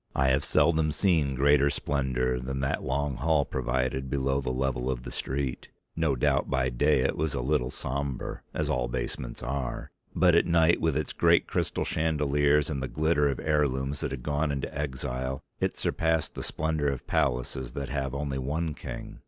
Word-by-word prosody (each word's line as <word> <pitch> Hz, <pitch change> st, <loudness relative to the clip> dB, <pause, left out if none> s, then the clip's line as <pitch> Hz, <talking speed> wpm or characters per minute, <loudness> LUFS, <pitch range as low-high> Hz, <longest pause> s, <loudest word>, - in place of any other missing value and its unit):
I 65 Hz, 0 st, +3 dB
have 65 Hz, +2 st, +2 dB
seldom 80 Hz, -2 st, +3 dB
seen 75 Hz, -5 st, +2 dB
greater 70 Hz, +1 st, +4 dB
splendour 65 Hz, -4 st, 0 dB
than 65 Hz, +2 st, -4 dB
that 65 Hz, -, 0 dB
long 70 Hz, 0 st, -1 dB
hall 80 Hz, -3 st, +2 dB
provided 65 Hz, +1 st, -1 dB
below 70 Hz, 0 st, 0 dB
the 65 Hz, -, -3 dB
level 65 Hz, -1 st, -1 dB
of 60 Hz, -2 st, -2 dB
the -, -, -7 dB
street. 65 Hz, -1 st, -3 dB, 0.3 s
No 80 Hz, -4 st, +1 dB
doubt -, -, +1 dB
by 65 Hz, 0 st, +1 dB
day 70 Hz, +3 st, +3 dB
it -, -, +1 dB
was 75 Hz, -2 st, -1 dB
a -, -, -1 dB
little 65 Hz, 0 st, +1 dB
sombre, 70 Hz, 0 st, -4 dB
as -, -, -2 dB
all 60 Hz, -1 st, 0 dB
basements -, -, -4 dB
are, 65 Hz, 0 st, -3 dB, 0.2 s
but 90 Hz, -2 st, +5 dB
at 85 Hz, -, +4 dB
night 85 Hz, 0 st, +4 dB
with 80 Hz, -3 st, +1 dB
its 75 Hz, -3 st, -2 dB
great -, -, +4 dB
crystal -, -, -1 dB
chandeliers, 75 Hz, -2 st, +2 dB
and 70 Hz, -4 st, -3 dB
the 65 Hz, -, -2 dB
glitter 75 Hz, 0 st, +2 dB
of 70 Hz, -, -2 dB
heirlooms 70 Hz, -2 st, 0 dB
that -, -, -2 dB
had 65 Hz, -2 st, -6 dB
gone 75 Hz, +1 st, 0 dB
into 70 Hz, -1 st, -4 dB
exile, 65 Hz, -1 st, -3 dB, 0.2 s
it -, -, -1 dB
surpassed 80 Hz, -1 st, 0 dB
the -, -, -6 dB
splendour 80 Hz, -2 st, -1 dB
of 70 Hz, -2 st, -2 dB
palaces 60 Hz, 0 st, -1 dB
that 70 Hz, -1 st, -4 dB
have 70 Hz, -1 st, -2 dB
only 70 Hz, -1 st, -2 dB
one 75 Hz, +5 st, -2 dB
king. -, -, -8 dB
70 Hz, 185 wpm, -28 LUFS, 65-75 Hz, 0.3 s, but